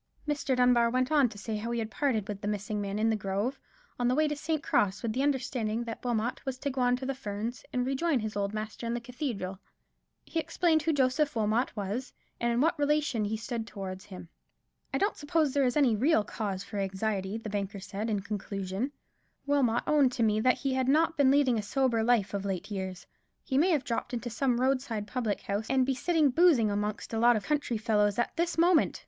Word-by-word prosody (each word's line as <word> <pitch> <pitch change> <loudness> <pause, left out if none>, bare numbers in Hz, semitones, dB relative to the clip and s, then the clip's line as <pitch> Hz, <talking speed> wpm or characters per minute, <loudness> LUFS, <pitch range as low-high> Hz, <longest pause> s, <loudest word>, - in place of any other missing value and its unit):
Mr. 285 -3 0
Dunbar 245 -2 +4
went 255 +3 0
on 285 -5 +4
to 210 - -11
say 215 +1 -4
how 225 +3 -4
he 235 - -1
had 220 -1 -3
parted 230 -8 0
with 205 -1 -5
the 205 - -3
missing 210 0 -2
man 200 0 -3
in 220 +1 +2
the - - +2
grove, 205 +6 -2 0.4
on 245 - +2
the 250 - +2
way 310 +1 +3
to 295 - -2
St. 310 0 -2
Cross, 200 +1 +1
with 225 -2 -1
the 255 - 0
understanding 245 -5 0
that 230 -1 -7
Wilmot 240 -1 -1
was 265 -1 -3
to 280 +2 -3
go 260 0 -2
on 245 0 +3
to 255 +1 -6
the 275 - -1
Ferns, 230 -1 -5
and 250 0 0
rejoin 275 +3 +1
his 215 -1 -4
old 200 -1 -1
master 215 +2 -5
in 235 - -1
the - - -2
cathedral. 235 -7 -4 0.7
He 330 - -2
explained 325 0 +2
who 325 - +1
Joseph 280 0 +1
Wilmot 220 +3 +1
was, 210 +6 -3 0.3
and 235 0 +1
in 235 +1 +1
what 325 +1 +2
relation 290 -6 +1
he 220 +2 -2
stood 225 0 -4
towards 190 -3 -7
him. 180 -3 -10 0.6
"I - - 0
don't 405 +2 +1
suppose 300 -1 0
there 280 -2 +3
is 250 +3 +1
any 260 -7 +4
real 250 0 +3
cause 200 -2 -4
for 210 - -7
anxiety," 195 +1 -2
the 225 -2 -7
banker 200 -1 -3
said, 200 +4 -4
in 205 -2 0
conclusion; 200 +3 -4 0.5
"Wilmot 270 -5 +2
owned 285 -4 +4
to 235 - 0
me 215 -1 +3
that 255 +3 +3
he 270 -1 -1
had 260 -1 0
not 320 +4 +3
been 285 -3 +4
leading 265 -4 +3
a - - -1
sober 240 +1 +1
life 220 -4 +2
of 200 -1 -2
late 195 +1 -4
years. 190 -2 -5 0.4
He 265 - -3
may 320 +7 +4
have 305 -7 +2
dropped 235 +1 -3
into 240 0 -4
some 245 0 +1
roadside 255 -5 0
public 220 -1 -2
house 205 +2 -3
and 260 -1 +3
be 270 - +1
sitting 305 +1 +2
boozing 285 -9 +4
amongst 210 +2 -3
a 225 - 0
lot 240 +1 +5
of 215 - -2
country 290 -6 0
fellows 210 -2 +1
at 240 - -1
this 340 0 -1
moment. 340 0 +3
235 Hz, 225 wpm, -29 LUFS, 210-275 Hz, 0.7 s, lot